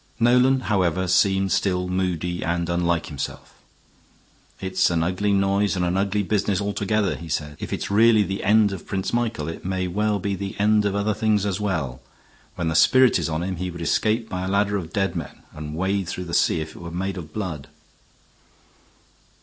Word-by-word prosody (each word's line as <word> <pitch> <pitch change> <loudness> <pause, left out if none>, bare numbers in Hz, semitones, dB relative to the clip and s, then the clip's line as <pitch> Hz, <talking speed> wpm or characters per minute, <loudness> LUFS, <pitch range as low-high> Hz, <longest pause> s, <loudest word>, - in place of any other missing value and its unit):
Nolan, 125 +3 +4
however, 95 -5 0
seemed 95 +1 +2
still 90 -2 +1
moody 90 -1 -2
and 85 +1 -1
unlike 85 -1 0
himself. 70 -3 -6 1.1
"It's 95 0 +1
an 85 -2 +1
ugly 95 +4 0
noise 100 +1 +2
and 90 -1 0
an 90 +1 0
ugly 100 +1 0
business 100 -1 0
altogether," 100 -3 0
he 85 +2 -9
said. 75 0 -3
"If - - -6
it's - - -3
really 110 +1 +5
the 95 +1 -4
end 105 +1 +4
of 95 -5 -7
Prince 95 -1 -2
Michael 115 -10 -1
it 80 - -6
may 95 0 -2
well 105 +3 0
be 100 +1 -2
the 100 +1 -5
end 105 0 +3
of 100 -1 0
other 100 +1 +1
things 105 -1 +1
as 100 -1 -1
well. 85 -12 -2 0.5
When 85 - -2
the 80 - -1
spirit 125 +10 +5
is 80 - -2
on 80 +1 -2
him 95 0 -3
he 90 +1 -3
would 85 -1 -8
escape 110 +6 +1
by 90 -3 -4
a - - -3
ladder 100 +1 +1
of 85 -5 -4
dead 95 -2 -1
men, 80 -4 -7
and 75 0 -7
wade 95 +2 -1
through 90 - -4
that 85 - -7
sea 80 - +2
if 80 0 -7
it - - -11
were 85 - -6
made 95 +3 -3
of 80 -4 -8
blood." 80 -9 -5
95 Hz, 200 wpm, -23 LUFS, 85-100 Hz, 1.1 s, really